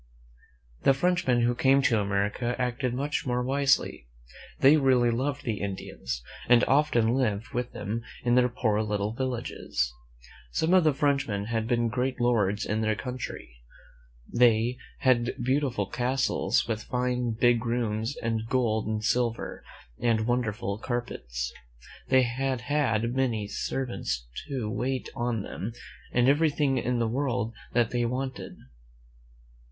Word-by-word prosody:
The 135 - +4
Frenchmen 175 -6 +2
who 120 +1 +3
came 135 +2 +3
to 115 -4 +3
America 105 +4 0
acted 125 0 -1
much 145 +3 -1
more 125 0 0
wisely. 135 - +1 0.5
They 140 +3 +7
really 130 -5 +4
loved 140 +4 -2
the 115 -6 -2
Indians, 65 -11 -4 0.3
and 120 -1 +6
often 135 -5 +3
lived 115 -5 0
with 125 -2 -3
them 105 +3 -3 0.2
in 120 -1 +2
their 125 0 +4
poor 110 -3 0
little 105 0 -1
villages. 120 - -2 0.6
Some 160 - +1
of 185 -2 +6
the 155 - +4
Frenchmen 140 -9 0
had 110 -1 0
been 120 -1 +2
great 125 +2 -1
lords 110 -4 +2
in 110 +1 -1
their 110 0 +2
own - - -6
country. 115 - -6 0.7
They 120 +1 +3 0.2
had 120 -2 +3
had - - -6
beautiful 130 -5 +1
castles, 125 +5 0
with 110 -2 -2
fine, 125 -1 -1
big 120 -2 +4
rooms, 115 0 -1
and 115 -1 -1
gold 110 -4 +1
and 110 0 -2
silver 115 +1 -1 0.4
and 115 -2 +2
wonderful 110 -4 -1
carpets. 65 - -4 0.5
They 130 -1 +5
had 130 +1 -1
had 120 -4 0
many 115 -6 0
servants 110 - -3 0.2
to 130 -6 -3
wait 130 +4 -2
on 120 -3 -1
them, 110 +4 -5 0.4
and 120 0 +3
everything 145 -2 +3
in 125 +1 0
the 115 -1 +1
world 120 -2 -1 0.2
that 120 -2 +2
they 120 -1 0
wanted. 130 +2 -4
120 Hz, 140 wpm, -27 LUFS, 110-130 Hz, 0.7 s, They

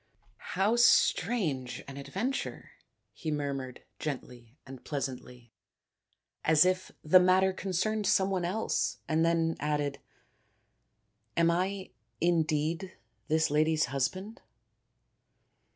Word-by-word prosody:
" - - -34 0.2
How 205 +5 +3
strange 165 - +2
an 135 - -8
adven 195 - -2
ture! - - -5 0.2
" - - -51
he 160 - -2
murmured 140 -4 -3 0.2
gently 125 -4 -6
and 135 -1 -11
pleasantly, 125 -4 -6 0.9
as 155 +1 +5
if 185 0 0
the 170 +4 +7
matter 185 +1 +4
concerned 200 +3 -1
some 190 +1 +3
one 185 -2 0
else, 190 +6 -1
and 160 0 +2
then 165 -1 +2
added, 145 -1 -1 0.7
" 105 - -45
Am 170 0 +4
I 190 +2 -2 0.6
indeed 165 +5 -2 0.3
this 160 -1 +2
lady's 155 +1 +3
husband 185 - -2
160 Hz, 115 wpm, -30 LUFS, 140-185 Hz, 0.9 s, the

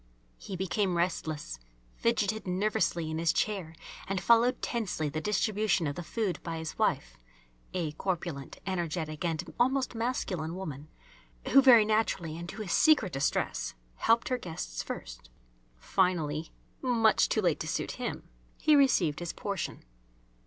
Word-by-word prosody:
He 195 - -6
became 190 0 0
restless, 160 - -2 0.3
fidgetted 220 -3 0
nervously 180 -4 0
in 160 - -2
his 165 -1 +3
chair, 185 -6 -1 0.3
and 195 -1 -1
followed 235 +6 +4
tensely 195 -10 -2
the 155 +2 -3
distribution 210 -2 +1
of 145 -1 -2
the - - -4
food 200 +1 -2
by 165 -1 -4
his 160 0 -5
wife, - - 0 0.6
a 165 -4 -1
corpulent, 160 -4 -4
energetic 170 -4 -3
and 165 -3 -2
almost 260 +1 +2
masculine 195 -9 -2
woman, 155 -6 -6 0.6
who, 275 - +8
very 240 -5 +8
naturally 210 -7 0
and 170 +1 -7
to 215 +2 -5
his 185 - -5
secret 250 - +4
distress, 135 - -1 0.2
helped 230 +1 +3
her 255 -1 0
guests 160 - -5
first. - - -7 0.5
Finally 160 - 0 0.3
much 230 -4 +3
too - - +1
late - - +2
to - - -4
suit - - -2
him - - -4 0.3
he 310 -1 +4
received 200 - +3
his 175 -1 -4
portion. 200 - -4
180 Hz, 145 wpm, -30 LUFS, 160-220 Hz, 0.6 s, who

